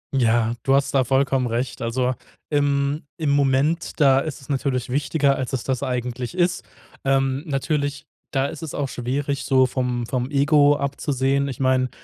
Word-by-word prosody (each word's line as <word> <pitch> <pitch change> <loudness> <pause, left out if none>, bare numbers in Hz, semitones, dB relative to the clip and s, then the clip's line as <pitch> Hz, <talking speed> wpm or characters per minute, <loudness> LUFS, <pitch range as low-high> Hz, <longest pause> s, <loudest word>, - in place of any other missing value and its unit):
Ja, 115 -2 +2
du 135 - +3
hast 140 0 +1
da 135 -2 +4
vollkommen 135 0 +1
recht. 120 +2 -3
Also, 125 +2 0 0.4
im 145 0 +1
im 155 -3 0
Moment, 140 +5 +1
da 135 -3 +5
ist 140 -1 -5
es 135 - -16
natürlich 135 -3 -1
wichtiger, 140 +1 +1
als 130 -1 -4
es 130 - -1
das 130 -3 -2
eigentlich 125 +4 -3
ist. 180 0 +1 0.4
Ähm, 135 0 +1
natürlich, 145 0 -2 0.2
da 135 -1 0
ist 140 +1 -6
es 160 -3 -6
auch 140 -2 -2
schwierig, 135 +3 -2
so 130 -1 +4
vom 125 -1 -2
vom 125 +1 -2
Ego 145 0 +4
abzusehen. 140 -1 0
Ich 130 -4 -6
meine, 130 -1 +2
135 Hz, 170 wpm, -22 LUFS, 130-145 Hz, 0.4 s, da